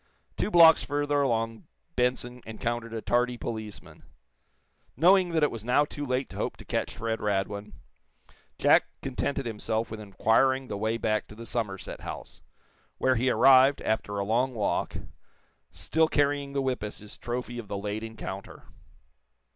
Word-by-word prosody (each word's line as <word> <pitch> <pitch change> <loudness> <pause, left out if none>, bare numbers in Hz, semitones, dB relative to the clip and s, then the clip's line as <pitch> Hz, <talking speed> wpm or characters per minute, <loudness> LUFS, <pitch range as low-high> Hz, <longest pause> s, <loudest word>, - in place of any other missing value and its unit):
Two - - -1
blocks 165 -4 +7
further 145 0 0
along 115 -4 -1 0.3
Benson 125 0 0
encountered 115 +1 -3
a 115 -1 -5
tardy 125 0 +1
policeman. 110 -3 -7 1.0
Knowing 185 +1 +5
that 160 -2 +1
it 150 - +3
was 115 -2 -6
now 125 +5 +3
too 145 0 -7
late 130 -1 -1
to - - -10
hope - - -3
to - - -12
catch - - -2
Fred 115 0 -2
Radwin, 100 0 -2 0.8
Jack - - +5 0.2
contented 135 0 -2
himself 110 0 -2
with 110 - -6
inquiring 120 +6 +2
the - - -3
way 110 +2 0
back 110 -2 0
to 105 - -12
the 115 +1 -9
Somerset 105 -5 -4
House, - - -8 0.6
where 130 - +3
he 130 +1 +1
arrived, 135 +2 +6
after 105 -2 -1
a 100 - -1
long 125 +4 +1
walk, 105 -2 -1 0.7
still 100 - +1
carrying 145 -2 0
the 140 -1 0
whip 130 -3 -1
as 105 0 -5
his 105 0 -9
trophy 120 0 -4
of 115 - -8
the 100 - -4
late 105 +2 -3
encounter. 110 -3 -7
120 Hz, 160 wpm, -28 LUFS, 110-135 Hz, 1.0 s, blocks